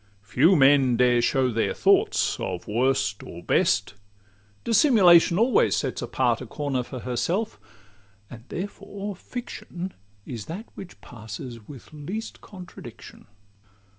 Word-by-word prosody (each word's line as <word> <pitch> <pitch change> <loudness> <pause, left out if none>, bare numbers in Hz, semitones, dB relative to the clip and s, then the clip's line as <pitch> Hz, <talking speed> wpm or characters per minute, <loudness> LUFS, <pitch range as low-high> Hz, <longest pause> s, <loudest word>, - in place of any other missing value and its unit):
Few 135 - +3
men 135 -4 +4
dare 125 -1 +3
show 130 +1 +1
their 115 0 -1
thoughts - - +2
of 90 -2 -5
worst 120 -2 0
or 85 +1 -10
best; 100 +2 +1 0.7
Dissimulation 195 - +5
always 235 +5 +3
sets - - -2
apart - - 0
A - - -7
corner 140 -4 -2
for 125 0 -8
herself; 175 - -2 0.7
and 115 -1 -12
therefore 200 +1 -6
fiction 190 -4 -7 0.3
Is 115 -5 -7
that 190 +8 -6
which 190 -3 -11
passes 115 0 -9
with 140 0 -13
least 185 +10 -7
contradiction. 185 -4 -12
140 Hz, 120 wpm, -25 LUFS, 120-190 Hz, 0.7 s, Dissimulation